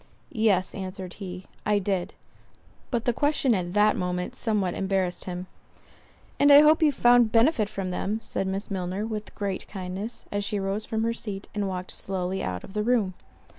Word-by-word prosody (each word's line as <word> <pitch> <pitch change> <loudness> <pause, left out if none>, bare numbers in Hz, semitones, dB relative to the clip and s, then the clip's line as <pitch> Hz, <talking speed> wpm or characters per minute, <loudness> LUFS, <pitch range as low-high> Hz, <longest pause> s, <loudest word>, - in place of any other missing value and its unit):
"Yes:" 210 -6 +2
answered 185 -1 -6
he, 185 -1 -6 0.2
"I 210 -1 +2
did." 190 -2 -1 0.7
But 240 -2 -1
the 245 - +2
question 290 -2 +2
at 180 -3 -2
that 210 +1 +4
moment 180 0 -2
somewhat 205 -6 0
embarrassed 190 -2 -1
him. 180 0 -5 0.9
"And 285 0 +6
I 285 +1 +10
hope 310 +2 +5
you 305 -2 +5
found 240 -4 +5
benefit 225 -2 +3
from 195 -3 -4
them:" 205 +4 -1
said 195 - -2
Miss 195 +2 -3
Milner, 190 +2 -2
with 215 -1 -5
great 200 -2 -3
kindness, 195 +4 -6
as 205 0 -1
she 205 0 -1
rose 195 +2 -2
from 220 0 -1
her 230 0 +1
seat, 205 -4 -5
and 205 -1 -1
walked 185 -1 -4
slowly 190 0 -3
out 90 -1 -3
of - - -11
the 210 - 0
room. 215 -4 +2
200 Hz, 180 wpm, -26 LUFS, 185-225 Hz, 0.9 s, I